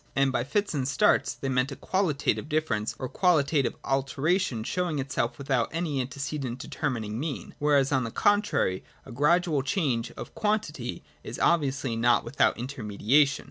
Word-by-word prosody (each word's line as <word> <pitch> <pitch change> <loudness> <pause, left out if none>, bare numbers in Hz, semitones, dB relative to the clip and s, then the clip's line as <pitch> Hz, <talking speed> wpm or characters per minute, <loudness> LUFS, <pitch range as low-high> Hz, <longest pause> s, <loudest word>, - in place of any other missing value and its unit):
And 135 -1 +3
by 120 - 0
fits 200 +10 -1
and 135 -4 -1
starts 140 - +3
{saltus) - - -26
they 135 - -2
meant 130 +1 +1
a - - -5
qualitative 165 -6 0
difference 120 -9 -1
or 130 - -4
qualitative 150 -4 +2
alteration 135 - 0
showing 175 +4 -1
itself 130 -3 -2
without 135 -4 0
any 160 -5 -1
antecedent 135 -1 -4
determining 120 -6 -3
mean: 150 -1 -4
whereas, 145 -2 +3
on 130 -2 +2
the 115 - -3
contrary, 205 - +1 0.2
a - - -11
gradual 150 +3 +2
change 135 - -1
(of - - -8
quantity) 215 0 -2 0.2
is - - -6
obviously 140 -7 +1
not 120 +1 +3
without 120 +5 +2
intermediation. 125 +3 +1
140 Hz, 155 wpm, -27 LUFS, 125-155 Hz, 0.2 s, And